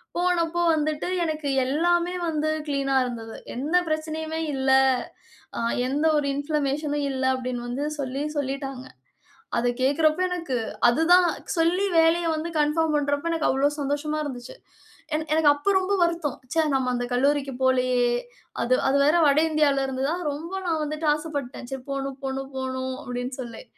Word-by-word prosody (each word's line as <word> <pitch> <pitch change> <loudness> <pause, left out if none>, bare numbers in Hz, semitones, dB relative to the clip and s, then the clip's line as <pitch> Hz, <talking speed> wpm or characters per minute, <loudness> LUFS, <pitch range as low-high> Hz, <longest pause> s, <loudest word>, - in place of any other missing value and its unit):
போனப்ப 345 -1 +1 0.2
வந்துட்டு 305 0 -1 0.2
எனக்கு 310 -2 -2 0.2
எல்லாமே 345 +6 +1
வந்து 310 -1 0 0.2
கிளீன்னா 275 -2 0
இருந்தது. 230 -2 -6 0.2
எந்த 290 +7 -1
பிரச்சனையுமே 315 0 -3
இல்ல. 265 0 +1 0.9
அ, - - -1 0.3
எந்த 290 +4 0
ஒரு 290 - 0
இன்ஃப்ளமேஷன்னும் 290 0 -1
இல்ல. 260 0 -3
அப்படின்னு 250 -1 -4
வந்து 270 +4 -2
சொல்லி, 270 0 -3 0.2
சொல்லிட்டாங்க. 270 -1 -3 0.7
அத 245 - +2
கேட்கிறப்ப, 310 +4 +3
எனக்கு 335 -8 -2 0.3
அதுதான் 345 +7 +5 0.3
சொல்லி 345 +4 +2
வேலைய 330 +1 +3
வந்து 320 +2 -3
கன்ஃபார்ம் 305 +1 +2
பண்றப்ப, 285 +3 -1
எனக்கு 325 -2 +1
அவ்வளவு 285 +3 +1
சந்தோஷமா 290 +2 -1
இருந்துச்சு. 255 - -7 0.6
எனக் 310 0 -2
எனக்கு 310 -2 +5
அப்ப 395 +8 0
ரொம்ப 380 +2 -1
வருத்தம். 335 -5 -1 0.2
ச்ச, 320 -1 +3
நம்ம 255 -1 +1
அந்த 245 0 -2
கல்லூரிக்கு 275 +1 +1
போலயே. 255 -1 +3 0.6
அது 255 +2 +3
அது 275 - +3
வேற 300 - +4
வட 285 +1 +4
இந்தியாவில 285 -3 +2
இருந்துதா 265 +4 -1 0.2
ரொம்ப, 315 +5 -7 0.2
நான் 320 -2 0
வந்துட்டு 305 +1 -3
ஆசைப்பட்டேன். 285 -5 -6
சரி, 265 -1 -5
போணும் 275 0 -4
போணும் 270 0 -4
போணும் 260 0 -3
அப்டின்னு 250 +1 -4
சொல்லி. 230 -2 -8
290 Hz, 145 wpm, -25 LUFS, 265-315 Hz, 0.9 s, அதுதான்